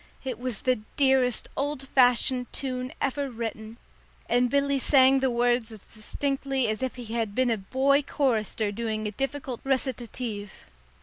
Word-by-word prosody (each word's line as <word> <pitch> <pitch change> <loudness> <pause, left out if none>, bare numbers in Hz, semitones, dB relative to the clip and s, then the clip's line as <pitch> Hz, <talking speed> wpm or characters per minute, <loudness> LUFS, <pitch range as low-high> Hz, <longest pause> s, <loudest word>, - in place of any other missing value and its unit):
It 255 -4 -4
was 250 -3 -3
the 255 -3 +2 0.2
dearest 265 -3 +3
old 280 -1 -3
fashioned 250 0 +3
tune 255 -1 -2
ever 280 0 -1
written, 225 -1 -6 0.5
and 245 +1 +2
Billy 280 +1 +1
sang 270 0 +5
the 265 0 +1
words 240 -1 +1
as 220 - -8
distinctly 270 +5 -2
as 215 +2 -2
if 260 -1 -2
he 235 -3 -7
had 225 -3 -2
been 255 -2 +2
a 225 - +1
boy 270 +8 +2
chorister 225 -7 0
doing 220 0 -3
a 210 - -2
difficult 270 +1 -4
recitative. 245 - -3
250 Hz, 150 wpm, -27 LUFS, 225-270 Hz, 0.5 s, sang